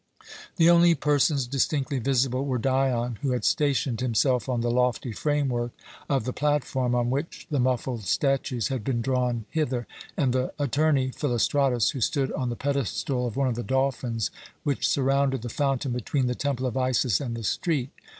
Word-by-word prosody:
The 165 -3 +4
only 170 0 +6
persons 145 -1 +2
distinctly 135 +1 0
visible 130 0 +1
were 130 -3 -1
Dion, 125 -2 0
who 135 -3 0
had 125 - -2
stationed 135 -5 +1
himself 125 +1 +1
on 120 -2 0
the 120 0 0
lofty 125 0 +1
framework 130 -3 -1 0.4
of 135 -2 +1
the 125 - -3
platform 135 -4 0
on 120 0 +1
which 140 +5 -3
the 145 - +1
muffled 125 -3 -1
statues 135 - 0
had 130 -5 -3
been 120 -1 -1
drawn 125 -3 0
hither, 130 -6 -1 0.3
and 130 -4 +2
the 130 0 -1
attorney 145 -1 +1
Philostratus, 130 -2 +1
who 135 - -5
stood 135 +3 +1
on 125 -1 -2
the 120 - -3
pedestal 135 -1 -1
of 115 - -6
one 140 -1 +2
of - - 0
the 120 - -3
dolphins 125 -5 -1 0.3
which 140 -2 0
surrounded 135 -2 +1
the 120 - -4
fountain 135 0 -1
between 125 +3 -1
the 125 - 0
Temple 135 -1 -2
of 125 - -2
Isis 130 -4 +1
and 120 -4 -3
the 115 - -6
street. 140 - -1
130 Hz, 175 wpm, -26 LUFS, 120-140 Hz, 0.4 s, only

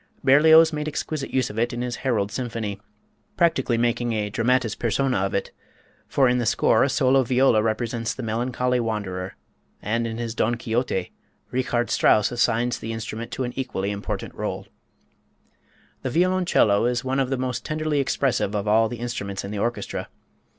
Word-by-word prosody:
Berlioz 160 +4 +6
made 150 0 -3
exquisite 155 -1 -3
use 130 -4 0
of 105 - -5
it 120 +1 +1
in 120 +1 -3
his 125 -2 -3
"Harold 110 -6 -1
Symphony," 115 -4 -4 0.6
practically 160 -9 +2
making 120 0 0
a 105 -2 -2
dramatis 120 0 +1
persona 125 +3 0
of 95 +1 -1
it, 100 - -2 0.6
for 135 -2 +3
in 125 0 +2
the 120 - -1
score - - +3
a 135 - +2
solo 135 0 +3
viola 125 -2 +3
represents 115 +1 -1
the 130 - -6
melancholy 125 +2 0
wanderer; 100 -5 -3 0.4
and 115 +3 -1
in 115 0 -5
his 115 -1 -3
"Don 120 +1 +1
Quixote," 115 -5 -2 0.4
Richard 120 -2 -1
Strauss 105 - +3
assigns 120 0 +1
to - - -16
the 115 - -4
instrument 115 +1 -6
an 125 -2 -2
equally 115 -7 -2
important 100 0 -5
rôle. - - -4 1.4
The 130 - -2
violoncello 170 - +3
is 120 0 -1
one 130 +1 -1
of 130 -2 0
the 135 - -1
most 125 -2 -3
tenderly 155 -1 -1
expressive 130 -6 0
of 105 0 -2
all 110 +1 +4
the 120 - -6
instruments 105 -5 -4
in 100 - -6
the 105 - -4
orchestra. 120 +3 -3
120 Hz, 170 wpm, -24 LUFS, 110-130 Hz, 1.4 s, Berlioz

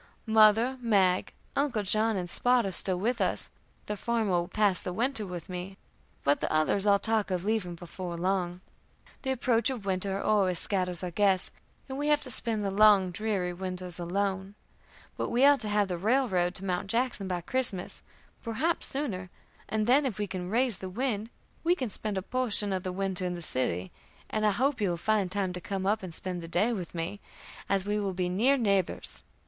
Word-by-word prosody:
Mother, 220 +3 +5
Mag, 195 -6 +2 0.2
Uncle 270 -7 0
John, 215 +2 +3
and 180 -1 -3
Spot 245 +5 +2
are 195 - -2
still 185 0 +2
with 230 +7 -1
us; - - 0 0.4
the 210 - -3
former 225 -1 -1
will 175 -1 +1
pass 205 -3 +1
the 180 - -4
winter 230 0 -1
with 175 -2 -7
me, 185 +1 -6 0.5
but 140 +1 +3
the - - -2
others 155 +6 +2
all 200 0 +6
talk 220 0 0
of 180 0 -2
leaving 205 -5 -1
before 175 0 -7
long. 180 0 -1 0.6
The 265 - -3
approach 245 -1 +2
of 245 -7 -5
winter 195 0 -1
always 195 -5 +2
scatters 180 -3 0
our 180 - -3
guests, 190 0 +2 0.4
and 265 0 -5
we 295 - -1
have 295 0 +3
to 255 - -1
spend 220 -3 +2
the 195 - -1
long, 200 -2 +5
dreary 190 -2 -1
winters 180 -1 -5
alone. 190 +2 -2 0.6
But - - -2
we 245 +3 +4
are 285 0 +7
to 215 -3 -1
have 205 -1 +2
the 180 -2 -3
railroad 195 -5 +1
to 195 - -4
Mt. 180 0 -1
Jackson 230 -2 0
by 180 -2 -2
Christmas, 215 -3 -1 0.4
perhaps 270 +10 0
sooner; 210 -10 -3 0.4
and 215 -1 0
then, 270 +4 +4
if 225 - -4
we 210 - -1
can 185 -2 -5
raise 235 -1 +2
the 190 - -6
wind, 220 0 -2 0.3
we 345 +2 +3
can 255 - -3
spend 210 0 -4
a 190 - -2
portion 215 -4 +1
of 185 - -1
the 185 - -4
winter 190 0 0
in 180 -1 -2
the 170 - -8
city, 95 - -2 0.4
and 215 0 +1
I - - +4
hope 260 +3 0
you 200 - +2
will 170 - -1
find 205 0 0
time 190 -2 -1
to 180 - -6
come 190 +1 -3
up 210 +3 +1
and 185 -2 -7
spend 180 +1 -3
the 165 - -8
day 205 +8 +1
with 180 -5 -6
me, 170 +5 -3 0.5
as 195 -1 +1
we 210 +1 0
will 195 -3 -2
be 180 -1 -1
near 240 +10 +3
neighbors. 200 -6 -1
200 Hz, 205 wpm, -29 LUFS, 180-225 Hz, 0.6 s, are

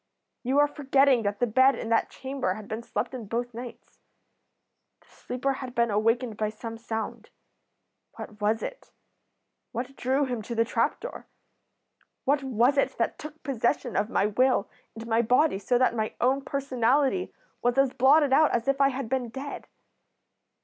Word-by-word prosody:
You 260 +3 0
are 290 0 +6
forgetting 275 -3 +3
that 205 -1 -2
the 245 - +3
bed 260 +4 +4
in 225 - -5
that 230 - +2
chamber 265 -8 -3
had 215 -1 -9
been 220 +1 -4
slept 235 - -3
in 240 -5 -6
both 240 +3 -3
nights. 240 +1 -10 1.0
The - - -27
sleeper 260 +2 -3
had 260 -1 -7
been 235 -1 +2
awakened 230 +2 +1
by 215 -1 0
some 225 +1 -8
sound. 225 -1 -5 0.9
What 210 0 -10
was 215 +2 +1
it? - - -7 0.8
What 250 +3 -4
drew 270 +3 +1
him 245 -4 -3
to 235 +3 -6
the 230 0 +2
trap - - 0
door? - - -8 1.0
What 280 +2 +2
was 260 +1 +2
it - - 0
that - - -1
took 305 +1 -10
possession 245 -2 -1
of 210 - +1
my 200 - +1
will 250 +1 +2 0.3
and 225 0 -8
my 230 0 +2
body 250 0 +3
so 245 +5 +1
that 255 -1 +3
my 220 -1 -2
own 265 +3 +2
personality 275 +5 0 0.3
was 245 +1 +1
as 270 -1 +3
blotted 280 +2 +4
out 310 +2 +5
as 235 +1 -2
if 275 0 +1
I 275 - +5
had 270 -2 -4
been 250 -1 -1
dead? 275 +4 -7
250 Hz, 175 wpm, -27 LUFS, 225-275 Hz, 1.0 s, are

